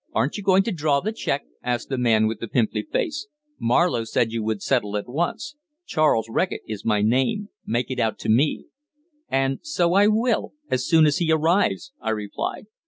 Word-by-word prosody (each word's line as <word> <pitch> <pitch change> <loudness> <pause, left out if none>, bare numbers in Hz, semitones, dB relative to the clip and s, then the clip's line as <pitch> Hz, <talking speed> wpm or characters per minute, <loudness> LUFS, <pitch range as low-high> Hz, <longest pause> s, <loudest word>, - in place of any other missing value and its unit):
"Aren't 135 - 0
you 205 - -4
going 195 0 +4
to 230 - -2
draw 150 -5 +1
the 215 +8 -2
cheque?" 220 - -2 0.2
asked 120 -1 -2
the 135 - -2
man 110 -3 +3
with 110 +1 -2
the 115 - -5
pimply 115 -1 0
face. 335 - -3 0.3
"Marlowe 120 0 +2
said 115 0 0
you 115 0 -2
would 110 -2 -2
settle 105 -6 0
at 105 - -5
once; 165 - -3 0.3
Charles 155 - +2
Reckitt 180 +11 -1
is 110 -2 -6
my 105 -2 +1
name. 130 - +1 0.2
Make 120 +2 -1
it 130 - -3
out 110 -2 0
to - - -5
me." 130 +8 +2 0.6
"And 135 0 0
so 180 - 0
I 200 +2 +5
will, 225 +2 +1 0.2
as 130 0 0
soon 160 -1 +5
as 150 -2 +2
he 165 -2 +1
arrives," 170 - +1
I - - -2
replied. 105 - -3
135 Hz, 195 wpm, -23 LUFS, 115-185 Hz, 0.6 s, I